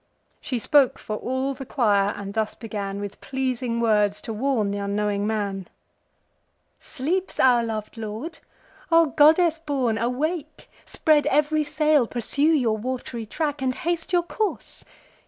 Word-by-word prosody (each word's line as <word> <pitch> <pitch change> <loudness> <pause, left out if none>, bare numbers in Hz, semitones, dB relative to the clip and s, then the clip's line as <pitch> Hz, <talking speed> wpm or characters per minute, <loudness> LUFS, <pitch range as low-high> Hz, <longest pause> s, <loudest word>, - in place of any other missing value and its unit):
She 255 - -2
spoke 270 +3 +3
for 215 - -5
all 260 +3 -2
the 270 +1 -8
choir, 205 -7 +2
and 200 -1 -7
thus 220 0 -1
began 200 -3 -5
With 205 -1 -7
pleasing 255 -3 -2
words 210 -3 +2
to 225 - -5
warn 225 -3 0
th' 200 - -3
unknowing 205 0 -1
man: 200 -4 -2 1.1
"Sleeps 330 +7 -3
our 245 -2 +5
lov'd 220 -1 -5
lord? 225 +10 -6 0.5
O 330 0 +6
goddess 315 +3 +4
born, 265 -8 -1
awake! 300 +7 -3 0.2
Spread 300 -3 +2
ev'ry 300 +1 +2
sail, 300 -3 +2
pursue 240 +4 -3
your 235 -8 +1
wat'ry 240 -1 -5
track, 295 +2 -2
And 255 -1 0
haste 340 +2 -2
your 350 -1 +3
course. 415 +4 -4
255 Hz, 140 wpm, -24 LUFS, 215-300 Hz, 1.1 s, O